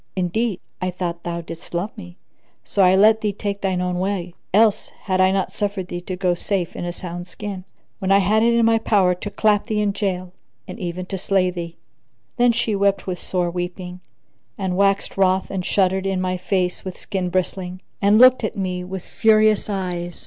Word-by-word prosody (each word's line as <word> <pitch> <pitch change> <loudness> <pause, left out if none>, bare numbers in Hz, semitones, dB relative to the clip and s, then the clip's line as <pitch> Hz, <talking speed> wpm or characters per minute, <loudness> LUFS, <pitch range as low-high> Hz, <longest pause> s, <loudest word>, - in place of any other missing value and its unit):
Indeed, 190 +3 -1 0.2
I 185 - 0
thought 175 -1 -4
thou 170 0 -4
didst 165 +1 -9
love 190 +6 -2
me, 180 -5 -11 0.5
so 200 - 0
I 185 0 +6
let 215 +3 +5
thee 210 - 0
take 200 0 -4
thine 185 -2 0
own 180 0 -1
way; 185 -2 -2 0.2
else 215 +1 +3
had 185 -1 0
I 185 - +5
not 190 0 0
suffered 200 -3 -3
thee 175 - -4
to 185 +1 -5
go 180 -1 +1
safe 180 0 -2
in - - -4
a 175 - -2
sound 175 0 -7
skin, 190 +1 -7 0.3
when 190 -1 -1
I 195 - +7
had 205 +3 +3
it 235 +1 +4
in 235 -1 +4
my 225 0 +4
power 195 -5 +3
to 180 +3 -6
clap 210 0 +2
thee 215 -3 0
in 205 -1 +1
jail 185 -3 -3 0.3
and - - -8
even 180 -1 -4
to 190 0 -4
slay 185 -1 +2
thee." 170 -1 -6 0.6
Then 245 0 +5
she 230 -2 0
wept 200 0 +1
with 180 -2 -4
sore 180 -2 -1
weeping 180 +1 -5 0.6
and 190 -2 -2
waxed 195 +1 +1
wroth 190 0 +2
and 190 -2 -2
shuddered 190 0 +1
in 190 -1 0
my 185 0 -1
face 180 0 -1
with 185 -1 -6
skin 185 -3 -3
bristling[FN#1] 185 0 -2 0.2
and 205 +1 +5
looked 255 +1 +7
at 215 - -3
me 180 -2 -2
with 185 0 -6
furious 215 -1 +3
eyes. 175 -3 -3
190 Hz, 205 wpm, -21 LUFS, 180-205 Hz, 0.6 s, I